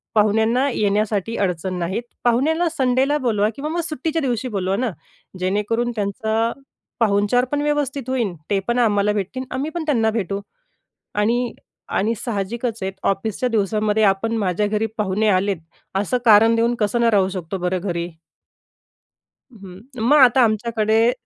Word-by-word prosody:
पाहुण्यांना 220 +5 +3
येण्यासाठी 210 +1 0
अडचण 185 -1 -1
नाहीत, 190 +7 -2 0.2
पाहुण्याला 305 +9 +2
संडेला 265 +3 +2
बोलवा 215 -6 +1
किंवा 290 +2 -4
मग 340 +1 -1
सुट्टीच्या 320 +2 -2
दिवशी 255 -2 -1
बोलवा 195 -4 -1
ना. 250 +1 0 0.5
जेणेकरून 210 +6 0
त्यांचा 220 +2 -1 0.5
पाहुणचार 210 +3 +2
पण 290 0 0
व्यवस्थित 285 -3 -1
होईल, 235 -8 0 0.2
ते 200 - +2
पण 240 +1 +1
आम्हाला 210 -3 +2
भेटतील, 210 +6 -3
आम्ही 275 +4 -2
पण 340 - -2
त्यांना 230 -7 +2
भेटू. 200 -2 -2 0.7
आणि 235 +3 +1 0.5
आणि 220 +4 +1
साहजिकच 230 +1 -3
आहेत, 190 0 -2
ऑफिसच्या 215 +5 -1
दिवसामध्ये 215 0 +1
आपण 195 +3 +2
माझ्या 200 0 0
घरी 215 +1 0
पाहुणे 210 +1 +1
आलेत, 195 0 +2 0.4
असं 205 +6 0
कारण 225 +1 +6
देऊन 235 +1 +2
कसं 210 +3 +1
न 235 - +3
राहू 190 -2 +3
शकतो 185 -1 -5
बरं, 180 0 -1
घरी. 170 -2 -3 1.4
हं. 195 -4 -12 0.2
मग 280 +7 +4
आता 260 -1 +6
आमच्याकडे 225 0 +2
220 Hz, 145 wpm, -21 LUFS, 200-245 Hz, 1.4 s, कारण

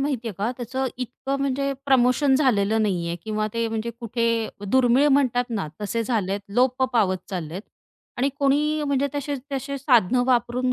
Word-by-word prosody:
माहितीये 250 -6 -2
का 210 +4 0
त्याचं 260 +2 -3
इतकं 255 +2 -4
म्हणजे 275 0 0
प्रमोशन 265 +1 +4
झालेलं 220 -6 +2
नाही 180 -5 0
आहे 170 - -3
किंवा 215 -1 -2
ते 230 0 0
म्हणजे 225 +1 -3
कुठे 235 0 -1 0.4
दुर्मिळ 260 +5 +4
म्हणतात 255 -3 +3
ना 205 -8 -2
तसे 220 +3 -1
झालेत 205 -4 -1
लोप 255 +2 +2
पावत 200 -6 +2
चाललेत 180 +1 -5 0.5
आणि 265 +2 +1
कोणी 295 +2 +2
म्हणजे 280 0 +1
तसे 285 0 -2 0.2
तसे 275 +1 -3
साधनं 250 -3 +3
वापरून 250 0 +1
245 Hz, 155 wpm, -24 LUFS, 220-270 Hz, 0.5 s, प्रमोशन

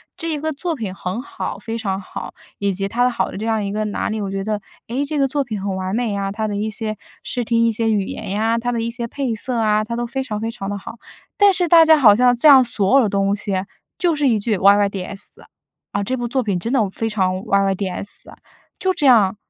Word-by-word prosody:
这 330 - -4
一 300 - -2
个 315 0 -2
作 335 +3 -3
品 215 -8 -5
很 190 +5 -4
好， - - -5
非 225 +2 -6
常 195 -4 -2
好， 190 - -8 0.3
以 200 -1 +1
及 195 +1 -2
它 240 +4 0
的 250 - +4
好 240 - -2
的 - - -7
这 220 - -4
样 220 -2 0
一 200 - -3
个 215 +1 -1
哪 210 - -2
里。 215 -1 -3
我 195 - -3
觉 195 0 -3
得， 210 -1 -2 0.3
哎， 235 - -4
这 305 - -3
个 275 -1 +3
作 280 +1 -1
品 215 -5 -5
很 195 -1 -2
完 190 +2 -3
美 230 -4 -1
啊， 195 0 -2
它 215 +1 -2
的 205 - -3
一 215 +2 -1
些 215 0 -4 0.3
视 245 -2 -2
听、 230 0 +2
一 230 - +3
些 225 +1 -1
语 200 -2 +1
言 - - -6
呀， 225 +3 +1
它 245 +1 -2
的 235 - -1
一 230 0 -2
些 235 -1 -4
配 260 -2 -2
色 240 +3 -3
啊， 215 -1 +2
它 235 +2 -4
都 240 0 -2
非 265 +3 -3
常 210 -4 -4
非 225 +1 -3
常 195 -3 -6
地 205 - -3
好。 215 - -9 0.4
但 405 -1 +6
是 355 -2 +1
大 330 0 +8
家 315 0 +7
好 225 -8 +7
像 245 +1 +4
这 240 - +3
样 270 -3 +9
所 235 +3 +3
有 - - +4
的 210 - +1
东 200 0 +1
西 205 -1 -4 0.4
就 350 -3 +2
是 290 -2 +1
一 225 -3 +3
句 215 0 0
YYDS，“ 200 0 +1 0.5
啊， 200 - 0
这 255 +6 -1
部 240 -1 -3
作 255 +1 0
品 195 -4 -1
真 230 +7 -3
的 230 -7 +2
非 225 +2 -2
常 190 -3 +1
YYDS 195 -1 -2
啊”， - - -14 0.4
就 375 0 +1
这 300 -5 -2
样， 210 -6 +5
220 Hz, 300 characters per minute, -20 LUFS, 200-245 Hz, 0.5 s, 样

